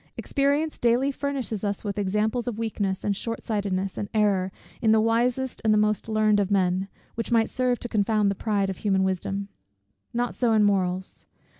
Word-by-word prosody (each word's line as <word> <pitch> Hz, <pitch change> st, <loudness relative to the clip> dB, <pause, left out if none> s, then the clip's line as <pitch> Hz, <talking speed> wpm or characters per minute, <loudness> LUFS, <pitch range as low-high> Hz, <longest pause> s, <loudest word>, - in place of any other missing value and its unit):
Experience 285 Hz, +2 st, 0 dB
daily 245 Hz, +4 st, +3 dB
furnishes 270 Hz, -7 st, -3 dB
us 200 Hz, -1 st, -2 dB
with 205 Hz, -1 st, -3 dB
examples 215 Hz, +5 st, 0 dB
of 235 Hz, -3 st, -2 dB
weakness, 205 Hz, -4 st, -2 dB
and 205 Hz, -1 st, 0 dB
short 230 Hz, +3 st, -4 dB
sightedness, 195 Hz, -3 st, -2 dB
and 200 Hz, -, -4 dB
error, 195 Hz, -3 st, +2 dB, 0.3 s
in 220 Hz, -3 st, +4 dB
the 220 Hz, -, +5 dB
wisest 240 Hz, +3 st, +1 dB
and 220 Hz, -, +3 dB
the 215 Hz, -, +4 dB
most 210 Hz, +1 st, +1 dB
learned 215 Hz, -1 st, +3 dB
of 195 Hz, -2 st, +1 dB
men, 190 Hz, -1 st, +1 dB, 0.3 s
which 230 Hz, +1 st, -4 dB
might 225 Hz, -1 st, +3 dB
serve 250 Hz, -1 st, +1 dB
to -, -, -5 dB
confound 210 Hz, -2 st, +2 dB
the -, -, 0 dB
pride 200 Hz, -1 st, 0 dB
of 190 Hz, -, -7 dB
human 195 Hz, -2 st, +1 dB
wisdom. 190 Hz, +1 st, -2 dB, 0.6 s
Not 240 Hz, 0 st, -1 dB
so 240 Hz, -3 st, +1 dB
in 215 Hz, -1 st, +4 dB
morals. 190 Hz, -2 st, 0 dB
215 Hz, 185 wpm, -25 LUFS, 195-235 Hz, 0.6 s, the